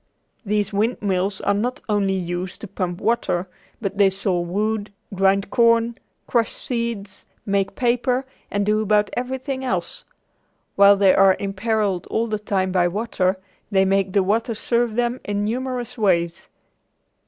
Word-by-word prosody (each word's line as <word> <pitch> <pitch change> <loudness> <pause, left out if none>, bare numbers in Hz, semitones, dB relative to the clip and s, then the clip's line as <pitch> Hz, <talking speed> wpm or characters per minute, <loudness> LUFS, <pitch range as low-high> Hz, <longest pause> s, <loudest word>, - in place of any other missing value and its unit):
These 210 -1 -1
windmills 200 -3 0
are - - +2
not 245 +7 -1
only 200 -3 +1
used 175 0 -4
to 215 - -6
pump 180 -1 -3
water, 205 -6 0 0.3
but 200 -2 -4
they 200 -1 +6
saw 190 -1 -1
wood, 205 +4 -2 0.2
grind 195 +1 +2
corn, 230 0 +3 0.3
crush 235 -2 +1
seeds, 230 -5 -4 0.2
make 195 -1 0
paper, 250 +1 +1 0.2
and 205 0 -1
do 215 +1 +2
about 210 -1 +2
everything 260 +2 -3
else. 255 - -3 0.7
While 200 0 +7
they 195 -1 +5
are 195 -1 +5
imperilled 200 -1 -1
all 225 - 0
the 215 -2 -2
time 190 -3 -1
by 180 -1 +3
water, 190 -1 0 0.3
they 195 -2 +3
make 195 -1 +1
the 200 - +3
water 225 +4 0
serve 235 0 0
them 240 +1 0
in 205 0 -2
numerous 250 +1 -3
ways. 170 -3 +1
205 Hz, 145 wpm, -22 LUFS, 190-230 Hz, 0.7 s, While